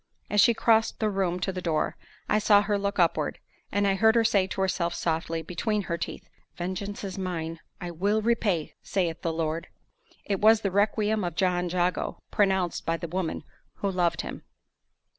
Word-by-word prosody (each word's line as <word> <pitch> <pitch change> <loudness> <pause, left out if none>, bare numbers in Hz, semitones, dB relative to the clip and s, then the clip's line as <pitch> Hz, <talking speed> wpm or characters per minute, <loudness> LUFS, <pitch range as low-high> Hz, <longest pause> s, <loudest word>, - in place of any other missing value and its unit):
As 205 -1 +5
she 235 +1 +5
crossed 225 0 +3
the 215 -1 +1
room 185 -2 0
to 190 - 0
the 185 -1 -5
door, 160 -3 0 0.3
I 215 - +3
saw 205 -1 +5
her 205 -1 0
look 200 0 -2
upward; 165 -4 +2 0.3
and 205 +1 +1
I 195 - +3
heard 220 +3 +4
her 230 - +5
say 200 -4 +3
to 190 - -3
herself 175 -2 0
softly, 165 0 -1
between 205 +5 -1
her 170 - -2
teeth, - - -5 0.3
"Vengeance 190 +4 -4
is 195 -1 -5
mine, 165 -3 -3 0.2
I 175 -1 -5
will 200 +6 +1
repay, 210 -8 +1
saith 170 -4 -1
the 165 - -1
Lord." 160 +1 -2 0.6
It 200 -2 -1
was 220 +1 +6
the 195 - -1
requiem 210 +1 +1
of 175 -2 -3
John 180 -1 +1
Jago, 180 +1 0
pronounced 190 -4 +1
by 165 0 0
the 170 +1 -5
woman 180 -1 -2 0.3
who 200 - -2
loved 175 -2 +1
him. - - -7
190 Hz, 185 wpm, -27 LUFS, 170-205 Hz, 0.6 s, was